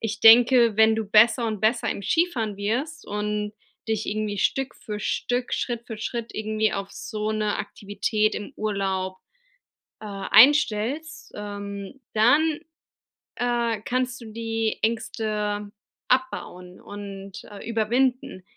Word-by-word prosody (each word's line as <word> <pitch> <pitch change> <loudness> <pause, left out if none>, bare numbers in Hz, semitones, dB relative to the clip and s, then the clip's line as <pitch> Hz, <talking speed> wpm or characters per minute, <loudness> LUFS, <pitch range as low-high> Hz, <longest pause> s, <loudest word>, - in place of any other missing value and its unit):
ich 220 0 -3
denke, 235 0 +7
wenn 220 0 +6
du 225 - -1
besser 225 +3 +5
und 215 -2 -2
besser 225 +2 +1
im - - -4
Skifahren 230 - 0
wirst 265 +10 -2
und 210 0 -2 0.4
dich 220 -1 -1
irgendwie 210 -1 -2
Stück 270 +4 0
für 210 -1 -6
Stück, 245 +3 -1
Schritt 235 -1 -3
für 225 - -6
Schritt 235 +1 -4
irgendwie 215 0 0
auf 195 0 -4
so 215 0 -4
'ne 215 -1 0
Aktivität 210 +1 -1
im 205 - -7
Urlaub, 190 -3 -2 0.8
äh, - - -10
einstellst, 255 +7 +3
ähm, 205 +3 -7
dann, 295 +8 +4 0.8
äh, 235 -3 0
kannst 250 0 -2
du - - -9
die 225 -1 -2
Ängste 215 -2 -2 0.4
abbauen 185 -8 -2
und, 200 -1 -9
äh, 205 +2 -9
überwinden. 230 -2 0
220 Hz, 125 wpm, -25 LUFS, 205-240 Hz, 0.8 s, denke